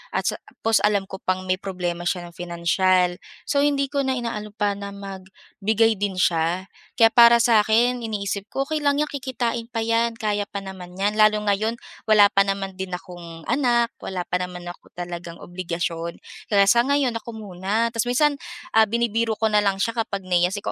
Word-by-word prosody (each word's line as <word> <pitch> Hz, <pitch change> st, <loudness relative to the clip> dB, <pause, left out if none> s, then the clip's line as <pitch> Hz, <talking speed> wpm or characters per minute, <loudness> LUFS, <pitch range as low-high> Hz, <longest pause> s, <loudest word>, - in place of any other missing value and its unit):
at -, -, +1 dB
sa -, -, 0 dB, 0.3 s
tapos 225 Hz, -1 st, +4 dB
alam 205 Hz, -1 st, +3 dB
ko 190 Hz, -, -8 dB
pang 185 Hz, 0 st, -1 dB
may 185 Hz, -, +2 dB
problema 180 Hz, -3 st, -4 dB
siya 175 Hz, -1 st, -2 dB
ng 170 Hz, -, -20 dB
financial. 175 Hz, +1 st, +1 dB, 0.3 s
So 280 Hz, -, +1 dB
hindi 280 Hz, -1 st, +1 dB
ko 280 Hz, -1 st, 0 dB
na 265 Hz, 0 st, 0 dB
inaano 215 Hz, -3 st, -5 dB
pa 205 Hz, -2 st, +1 dB
na 200 Hz, 0 st, -7 dB
magbigay 200 Hz, +3 st, -2 dB
din 200 Hz, 0 st, -1 dB
siya. 175 Hz, +2 st, +1 dB, 0.3 s
Kaya 225 Hz, -1 st, +8 dB
para 235 Hz, 0 st, +7 dB
sa'kin, 230 Hz, +2 st, +3 dB
iniisip 200 Hz, -2 st, -3 dB
ko, 270 Hz, -, 0 dB
"Okey 310 Hz, 0 st, -1 dB
lang 285 Hz, 0 st, +3 dB
yan, 300 Hz, -, 0 dB
kikitain 245 Hz, -4 st, -3 dB
pa 230 Hz, -2 st, -3 dB
yan. 230 Hz, 0 st, +1 dB
Kaya 210 Hz, -2 st, -1 dB
pa 200 Hz, -, -6 dB
naman 185 Hz, -2 st, -9 dB
niyan." 205 Hz, +2 st, 0 dB
Lalo 215 Hz, 0 st, +5 dB
ngayon, 210 Hz, +3 st, 0 dB, 0.3 s
wala 210 Hz, -2 st, +7 dB
pa 195 Hz, -, +4 dB
naman 195 Hz, -1 st, -3 dB
din 190 Hz, -1 st, -5 dB
akong 175 Hz, -2 st, -10 dB
anak, 240 Hz, -3 st, +2 dB
wala 185 Hz, -2 st, -4 dB
pa 180 Hz, -, +1 dB
naman 180 Hz, -1 st, -5 dB
ako 175 Hz, -, -12 dB
talagang 175 Hz, -1 st, -6 dB
obligasyon. 170 Hz, -1 st, -4 dB, 0.3 s
Kaya 200 Hz, -2 st, +4 dB
sa 235 Hz, -, +6 dB
ngayon, 280 Hz, -3 st, +2 dB
ako 235 Hz, 0 st, -9 dB
muna. 210 Hz, +2 st, -2 dB
Ta's 230 Hz, +1 st, -1 dB
minsan, 285 Hz, +4 st, +2 dB, 0.4 s
ah, 220 Hz, -, +7 dB
binibiro 230 Hz, 0 st, 0 dB
ko 220 Hz, +1 st, +1 dB
na 210 Hz, -, +4 dB
lang 200 Hz, -2 st, +1 dB
siya 230 Hz, -, +1 dB
kapag 200 Hz, -3 st, -5 dB
nahihiya, 180 Hz, -1 st, +2 dB
sabi 205 Hz, 0 st, -5 dB
205 Hz, 190 wpm, -23 LUFS, 185-230 Hz, 0.4 s, Kaya